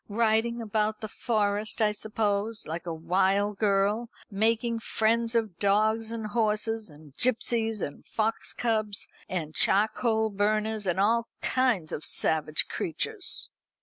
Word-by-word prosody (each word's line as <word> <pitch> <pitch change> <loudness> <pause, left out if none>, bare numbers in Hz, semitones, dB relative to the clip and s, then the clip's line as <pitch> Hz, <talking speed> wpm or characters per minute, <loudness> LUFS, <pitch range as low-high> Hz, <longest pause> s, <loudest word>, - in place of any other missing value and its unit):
Riding 230 +2 +1
about 215 0 -1
the 215 - -4
Forest, 210 -1 -1
I 215 -1 +3
suppose, 210 0 -2
like 165 +2 -5
a - - -2
wild 195 +5 +1
girl, 210 +3 +1 0.2
making 230 +3 +1
friends 230 +1 +1
of 220 -7 -1
dogs 215 +2 +2
and 230 -1 -4
horses, 215 -1 0
and 150 -2 -15
gipsies, 225 -2 +2
and 145 - -5
fox 225 +1 -2
cubs, 215 -4 -1 0.2
and 160 -4 -3
charcoal 220 +3 +2
burners, 215 +1 0
and 180 +1 0
all 230 +3 +2 0.2
kinds 245 -11 +1
of 150 - -4
savage 155 -1 +1
creatures." 375 - -2
215 Hz, 130 wpm, -28 LUFS, 200-225 Hz, 0.2 s, I